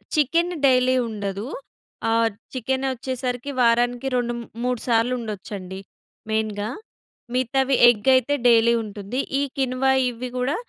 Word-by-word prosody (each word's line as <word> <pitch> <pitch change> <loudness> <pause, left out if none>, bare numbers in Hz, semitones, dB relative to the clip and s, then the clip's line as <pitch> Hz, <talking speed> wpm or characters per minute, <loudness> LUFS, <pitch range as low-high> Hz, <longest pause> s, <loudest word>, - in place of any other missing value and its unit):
Chicken 335 +5 +2
daily 255 -1 +4
ఉండదు. 200 0 -4 0.7
ఆహ్, 230 0 +3 0.2
chicken 260 +2 -1
ఒచ్చేసరికి 255 +1 -4
వారానికి 245 +2 +2
2 240 -1 0
మ్ - - -6 0.2
మూడు 250 -2 0
సార్లుండొచ్చండి. 215 -5 -2 0.5
మెయిన్‌గా. 215 -1 -1 0.6
మిగతావి 265 +2 +1
ఎగ్ 225 +1 0
అయితే 255 +3 +2
డైలీ 235 0 +5
ఉంటుంది. 205 +4 -5 0.2
ఈ - - +1 0.2
కిన్వా 265 0 +1 0.2
ఇవ్వి 245 +1 -6
గూడా 255 +4 0
245 Hz, 120 wpm, -23 LUFS, 225-260 Hz, 0.7 s, డైలీ